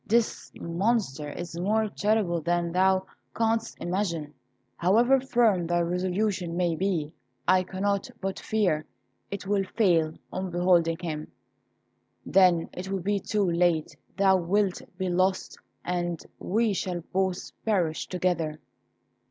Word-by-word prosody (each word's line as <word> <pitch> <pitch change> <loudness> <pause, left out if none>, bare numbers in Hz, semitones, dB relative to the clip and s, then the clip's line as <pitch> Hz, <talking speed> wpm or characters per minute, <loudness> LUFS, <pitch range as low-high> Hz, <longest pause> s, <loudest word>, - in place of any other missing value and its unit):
This 230 +1 0
Monster 170 - -1
is 170 +2 -6
more 215 +4 +1
terrible 205 -5 +1
than 170 +1 0
thou 190 +1 +3 0.3
canst 225 0 0
imagine. 170 -5 -2 0.4
However 235 +9 +4
firm 230 -9 +2
thy 175 0 +2
resolution 180 0 -1
may 175 -2 +1
be, 170 -4 -1 0.3
I 185 - +5
cannot 195 +3 -1
but 190 0 -3
fear 185 -8 0 0.4
it 200 -1 -5
will 200 0 +1
fail 170 -6 +2 0.2
on 185 0 -3
beholding 175 -2 +3
him; 155 -3 -5 0.9
then 180 -3 +4
it 185 +1 -6
will 195 -2 -2
be 205 +1 +1
too 205 -1 0
late; 170 -2 +1 0.2
thou 195 -1 +5
wilt 185 +2 +1 0.2
be 190 -1 -1
lost, 185 +1 0 0.3
and 175 -2 -1 0.2
we 220 +2 +1
shall 180 -2 -2
both 190 -1 -1
perish 180 -8 0
together." 170 -4 -1
185 Hz, 125 wpm, -27 LUFS, 170-200 Hz, 0.9 s, I